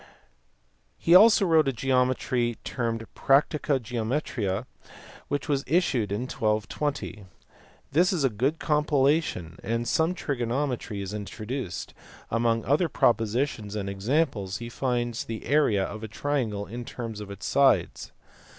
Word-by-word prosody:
He 170 - +2
also 205 +2 +8
wrote 160 -4 +4
a - - +3
geometry 125 -1 0
termed 115 -2 -2
Practica 140 0 +2
Geometriae 115 -3 -2 0.6
which 145 +1 -2
was 140 -3 0
issued 135 - +1
in 105 +3 -1
1220. 110 0 -2 0.7
This 175 +6 +4
is 175 -7 0
a 135 - +3
good 130 +9 0
compilation 145 - +1
and 115 +1 -2
some 160 +8 +1
trigonometry 125 - -2
is 95 +1 -6
introduced; 105 0 -5 0.4
among 115 0 +1
other 155 +6 +2
propositions 115 -2 0
and 100 -2 -3
examples 105 - -1
he 120 0 -7
finds 120 -2 -1
the 115 -1 -6
area 135 -9 +3
of 105 +2 -5
a - - -4
triangle 110 -4 -2
in 120 +4 -6
terms 115 -3 -6
of 105 -1 -8
its 100 0 -8
sides. 140 -1 +2
120 Hz, 130 wpm, -27 LUFS, 110-145 Hz, 0.7 s, also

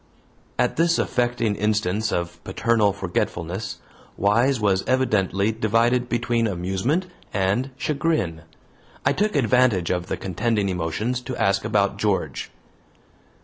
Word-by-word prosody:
At 125 - +1
this 170 +1 +3
affecting 120 -3 0
instance 105 0 0
of 85 0 -3
paternal 115 -3 +2
forgetfulness, 95 0 -3 0.4
Wise 115 +6 +3
was 95 -3 +2
evidently 105 -5 +2
divided 115 +3 +1
between 120 -1 +1
amusement 95 - -1 0.3
and 100 +7 +1
chagrin. 140 - -1 0.6
I 135 - +4
took 210 +6 0
advantage 125 - +3
of 90 0 -2
the - - -2
contending 105 +2 -1
emotions 95 +8 -2
to 125 0 -6
ask 100 0 +2
about - - +1
George. - - -1
110 Hz, 115 wpm, -23 LUFS, 95-125 Hz, 0.6 s, I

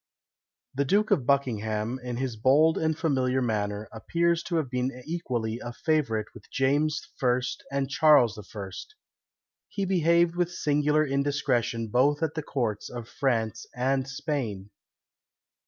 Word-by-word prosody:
The 140 - +1
Duke 205 +10 +2
of 145 -12 +2
Buckingham, 115 -3 0
in 125 -1 -4
his 130 -2 -2
bold 140 +8 +4
and 160 -1 0
familiar 130 -6 +1
manner, 105 -3 -1
appears 170 +9 0
to 175 - -2
have 160 -4 +1
been 125 +1 0
equally 120 -9 -3
a 120 - -6
favourite 135 -9 0
with - - -14
James 145 +3 +1
I. 125 -1 +3 0.3
and 140 0 0
Charles 140 -6 +5 0.2
I. 100 -3 -6 1.0
He 200 - -2
behaved 170 -2 +3
with 175 0 0
singular 150 -1 +2
indiscretion 135 -5 0
both 145 +7 +2
at 160 -2 0
the 160 - -3
courts 120 -8 -2
of 120 -2 -7
France 115 -7 -1
and 130 +1 0
Spain. 135 -9 -4
135 Hz, 140 wpm, -27 LUFS, 120-155 Hz, 1.0 s, Charles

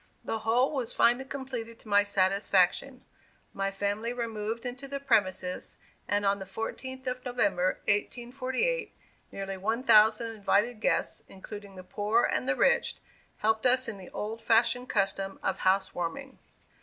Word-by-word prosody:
The 225 - -2
whole 240 +5 +2
was 255 -5 -2
finally 245 +3 +4
completed 255 -4 -6
to - - -17
my 205 -1 +5
satisfaction. 200 +5 +1 0.5
My 195 0 -1
family 205 +4 -2
removed 230 -1 -4
into 250 +3 -5
the 280 0 -4
premises, 190 -8 0 0.3
and, 205 0 0
on 200 0 +2
the 190 - -6
fourteenth 260 +6 -6
of 255 0 -3
November, 200 -7 0
1848, 255 - -1 0.4
nearly 195 -1 -5
one 220 +6 -1
thousand 220 0 +5
invited 215 +2 +1
guests, - - +1
including 200 +1 -10
the 185 - -9
poor 210 +5 +1
and 255 - 0
the - - +2
rich, 485 -1 +2 0.4
helped 220 +3 +2
us 255 +1 +4
in 205 -3 -5
the 185 - -11
old 220 +2 -5
fashioned 235 +2 +2
custom 195 -1 0
of 195 - -1
"house 190 +1 +2
warming." 255 +11 -5
225 Hz, 150 wpm, -29 LUFS, 200-250 Hz, 0.5 s, my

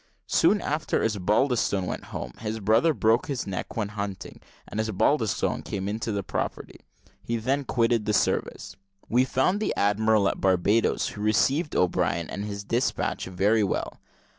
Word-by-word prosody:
Soon - - +3
after - - -1
Osbaldistone 105 0 +1
went - - -5
home, 60 - -6
his 110 0 -4
brother 110 +11 +3
broke 115 -4 +2
his 135 -4 -3
neck 95 +2 -5
when 105 -3 -1
hunting, 100 -2 -6 0.3
and 110 - -5
Osbaldistone 110 +1 +1
came 95 -1 -4
into 110 +2 -2
the 100 -1 -2
property. - - -4 0.4
He 115 - -2
then 135 +5 -1
quitted 115 -3 +1
the 105 - +1
service. 95 - -1 0.3
We 125 +3 +3
found 130 +10 +1
the 215 - -1
admiral 105 0 +3
at - - -2
Barbadoes, 95 +4 +2
who 105 - -8
received 135 +9 +1
O'Brien 85 -2 0
and 100 - -4
his 100 -1 -5
despatch 120 +5 -1
very 100 +4 +2
well. 100 - -2
105 Hz, 155 wpm, -26 LUFS, 100-115 Hz, 0.4 s, Soon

